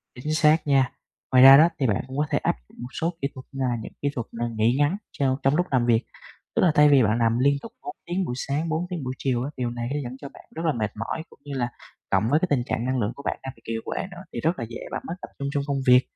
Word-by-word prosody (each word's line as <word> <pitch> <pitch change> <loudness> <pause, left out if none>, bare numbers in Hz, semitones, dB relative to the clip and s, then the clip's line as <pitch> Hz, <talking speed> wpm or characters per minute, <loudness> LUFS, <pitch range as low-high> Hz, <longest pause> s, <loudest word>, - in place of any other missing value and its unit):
Chính 150 +5 -3
xác 155 0 +4
nha. 135 -3 +3 0.4
Ngoài 130 - +7
ra 135 0 +11
đó 160 +3 +7
thì 135 - +2
bạn 100 -4 0
cũng 130 +1 -7
có 150 - +2
thể - - +2
áp - - 0
dụng - - -21
một 125 - -5
số 170 +2 0
kỹ 140 - +1
thuật 130 - -9
như 135 -1 -2
là 120 - 0
những - - -8
kỹ 145 - +2
thuật 120 -6 -3
là 120 +1 -2
nghỉ 115 +3 +3
ngắn 145 +6 +2 0.2
trong 130 -2 +2
trong 135 +2 +3
lúc 180 - +1
làm 125 -3 +2
việc. 115 -1 +3 0.5
Tức - - +3
là 170 -4 +5
thay 150 0 +7
vì 140 -3 +6
bạn 110 +1 +2
làm 115 0 +2
liên 140 +3 +4
tục 230 - -9
4 365 - -7
tiếng 180 +2 -1
buổi 125 - -3
sáng, 145 +5 -2
4 160 +3 -1
tiếng 175 -6 -4
buổi 130 0 -3
chiều 125 -3 0
á, 145 - -3
điều 125 -2 -1
này 120 0 -4
nó 150 - -1
dẫn 125 -1 -6
cho 140 - -7
bạn - - -14
rất 165 - -3
là 155 - +3
mệt 110 -3 -2
mỏi 160 - -4
cũng - - -18
như 145 - -7
là 120 - 0 0.4
cộng 100 +3 +2
với 150 +3 +4
cái 185 - +2
tình 135 -4 +2
trạng 120 -1 -2
năng 130 0 0
lượng 110 +1 0
của 140 - -9
bạn - - -2
đang 135 0 -6
bị - - -23
kiệt 115 0 -2
quệ - - -3
nữa, 175 0 -9
thì 120 - -3
rất 165 +4 0
là 115 - -2
dễ 120 - -7
bạn - - -3
mất 165 - -4
tập - - -6
trung 140 0 -2
trong 145 -2 0
công 140 -1 -1
việc. 125 0 +7
135 Hz, 315 wpm, -25 LUFS, 120-150 Hz, 0.5 s, ra